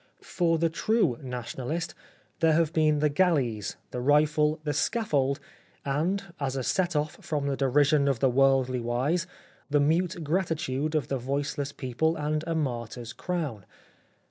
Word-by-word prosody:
For 165 -2 +1
the 165 +1 +2
true 215 - +1
Nationalist 130 +5 -4 0.5
there 165 -1 +4
have 165 0 +2
been 155 -2 +3
the 150 - +4
galleys, 140 - +1
the 125 - -3
rifle, 150 +2 +3
the 150 -1 -1
scaffold, 145 - +1 0.5
and, 160 +9 0 0.2
as 135 -2 -2
a 130 - -2
set 175 +3 0
off 150 0 -2
from 150 -3 -2
the 140 -1 0
de 135 -1 0
rision 145 +1 +4
of 135 - +1
the 135 - +4
worldly 130 -1 +3
wise, 130 +9 0 0.4
the 145 0 +3
mute 165 +3 +1
gratitude 155 -3 -1
of 150 -6 0
the 135 - -1
voiceless 140 +2 -2
people 145 +6 -1
and 155 0 -1
a 165 - -1
martyr's 120 -5 -3
crown. 150 - -3
145 Hz, 155 wpm, -27 LUFS, 130-160 Hz, 0.5 s, there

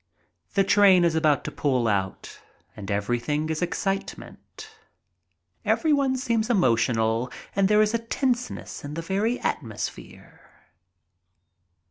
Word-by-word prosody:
The 195 - +4
train 190 -2 +5
is 170 - +2
about 155 -4 +2
to - - -5
pull 130 -5 0
out 95 -3 -3 0.4
and 100 -2 -8
everything 120 +10 -1
is 160 - -3
excite 195 +2 -2
ment. 435 - -13 1.0
Everyone 280 -4 +2
seems 230 -3 -1
emotional 115 - +1 0.2
and 195 -1 +3
there 210 +1 +4
is 215 +1 0
a 230 - +1
tense 250 +1 -1
ness - - -8
in 145 +1 -6
the 165 - -4
very 205 +7 -1
atmosphere. 115 -7 -5
170 Hz, 125 wpm, -25 LUFS, -, 1.0 s, train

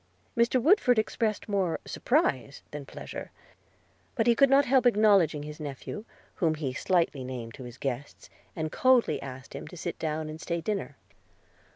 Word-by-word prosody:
Mr. 235 +2 +3
Woodford 250 - +4
expressed 215 0 0
more 195 -5 0
surprise 140 - 0
than 145 -2 -7
pleasure. - - -7 0.9
But 225 - +1
he 235 - +6
could 275 +3 +5
not 275 +1 +5
help 260 -1 +4
acknowledging 200 -9 +4
his 150 0 -8
nephew, 150 - -6 0.3
whom 165 -5 +2
he 145 -4 -3
slightly 165 -3 +1
named 125 -3 -6
to 130 - -9
his 120 0 -10
guests, 135 +1 -5 0.3
and 155 -1 -3
coldly 255 -2 +3
asked 130 -1 -9
him 140 - -7
to 175 - -10
sit 175 - -5
down 155 0 -2
and 155 +1 -8
stay 170 -1 -2
dinner. 180 -5 -3
165 Hz, 165 wpm, -28 LUFS, 140-230 Hz, 0.9 s, he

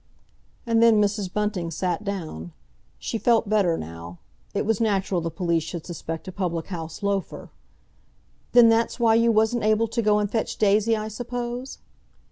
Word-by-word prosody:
And 230 -1 +2
then 230 -2 +6
Mrs. 205 -2 0
Bunting 205 -5 -2
sat 180 +3 -2
down. 160 - -5 0.4
She 225 - -4
felt 230 -2 +3
better 195 -5 +2
now. 85 +2 -8 0.3
It - - -2
was 225 0 0
natural 195 -4 +1
the 165 - -2
police 170 -1 0
should 165 +1 -6
suspect 165 -1 -6
a - - -5
public 175 -3 -3
house 165 -1 -6
loafer. 200 -1 -3 1.0
"Then 240 -1 +8
that's 225 +2 +2
why 230 -2 +4
you 230 +1 +4
wasn't 220 +2 +2
able 215 +1 +2
to 235 +1 -1
go 210 -1 +3
and 210 -1 +1
fetch 225 - -2
Daisy, 215 +2 +3
I 215 0 -4
suppose?" 245 +3 -5
210 Hz, 165 wpm, -24 LUFS, 175-225 Hz, 1.0 s, Then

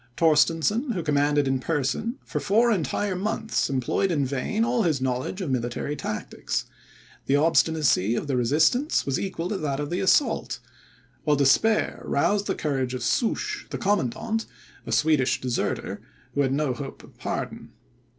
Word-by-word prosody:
Torstensohn, 165 - +3
who 175 -5 -3
commanded 145 -1 +2
in 135 0 +1
person, 150 - -1
for - - -3
four 230 +4 +3
entire 190 - 0
months 215 +3 -1
employed 135 +8 0
in 150 -6 +1
vain 140 - -1
all 245 -1 +1
his 160 -9 +1
knowledge 130 +9 -2
of 165 -7 -2
military 125 +3 -2
tactics; - - -3 0.6
the 135 - +3
obstinacy 150 - +3
of - - -2
the 140 -3 -1
resistance 155 - +2
was 135 -1 0
equal 180 -3 -3
to 210 - -1
that 145 -5 -2
of 145 +1 -3
the 175 - -1
assault; 190 - +2 0.7
while 150 -1 +3
despair 145 +11 +3
roused 205 +8 +1
the 195 - 0
courage 135 -4 -1
of 125 - -5
Souches, 405 - -1
the - - -4
commandant, 210 - -1 0.4
a - - -4
Swedish 150 -4 +2
deserter, 125 -2 -2 0.3
who 145 - +1
had 135 -2 +1
no 140 -1 0
hope 135 +2 -8
of - - -17
pardon. - - -4
150 Hz, 160 wpm, -25 LUFS, 135-205 Hz, 0.7 s, Torstensohn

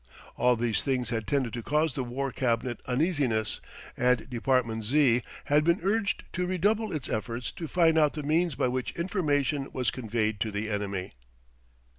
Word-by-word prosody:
All 125 0 +3
these 115 -2 0
things 125 -3 -1
had 115 -3 -2
tended 135 -5 0
to 120 - -3
cause 150 +4 +1
the 135 - -2
War 130 +3 -3
Cabinet 120 -1 -1
uneasiness, 130 - 0 0.3
and 125 0 +2
Department 120 -2 +1
Z. 125 0 +4 0.2
had 150 +1 +3
been 170 +3 +3
urged 200 +1 0
to 180 0 -1
redouble 205 +5 +1
its 155 -5 -3
efforts 115 +2 -3
to 165 - -6
find 165 -1 +4
out 150 -2 +3
the 150 - -5
means 165 +3 +1
by - - +1
which 125 0 -2
information 150 -6 0
was 125 -3 0
conveyed 110 -3 -1
to 110 - 0
the 105 +1 -3
enemy. 100 -2 -3
130 Hz, 170 wpm, -28 LUFS, 115-155 Hz, 0.3 s, Z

